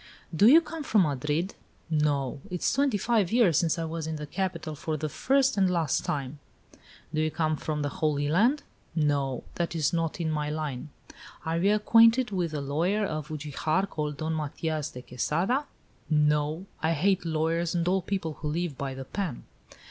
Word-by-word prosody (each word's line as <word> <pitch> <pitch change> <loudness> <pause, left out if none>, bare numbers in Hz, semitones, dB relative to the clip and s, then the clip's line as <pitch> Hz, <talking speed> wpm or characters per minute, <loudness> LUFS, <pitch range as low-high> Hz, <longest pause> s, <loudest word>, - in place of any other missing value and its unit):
"Do 205 +7 +6
you 310 +7 +8
come 325 0 -7
from 220 -8 +3
Madrid?" 150 +4 -1 0.4
"No. 145 -3 0
It 180 -2 -4
is - - +2
twenty 275 -4 +2
five 210 -3 +1
years 215 - +4
since 165 -1 +1
I 165 - -2
was 160 -1 -4
in 160 - -3
the 150 0 -5
capital, 170 -1 -3
for 155 +1 -3
the 155 +1 -3
first 270 - +2
and 190 -2 +4
last 165 -6 +1
time." 140 0 -3 0.7
"Do 155 - +1
you 155 - +1
come 155 -1 0
from 150 0 -3
the 145 - 0
Holy 145 -2 +1
Land?" 230 - +3 0.3
"No; 140 -5 0
that 170 0 -1
is 155 -2 +1
not 165 0 -1
in 160 -2 -1
my 150 -1 -1
line." 150 -2 -4 0.6
"Are 165 +1 0
you 200 +4 +4
acquainted 230 +2 +5
with 180 -4 -1
a 145 - -2
lawyer 170 +10 0
of 155 -4 -4
Ugijar, 155 +3 -1
called 150 -4 -4
Don 160 0 -2
Matias 155 0 -2
de 125 - -10
Quesada?" 170 - -1 0.4
"No; 150 +2 +2 0.2
I 160 +1 +2
hate 185 +4 +2
lawyers 165 +1 0
and 170 0 0
all 190 +1 +2
people 175 -5 -3
who 150 - -4
live 160 -2 -2
by 135 -1 -3
the 135 0 -7
pen." 180 -4 -4
160 Hz, 185 wpm, -28 LUFS, 150-190 Hz, 0.7 s, you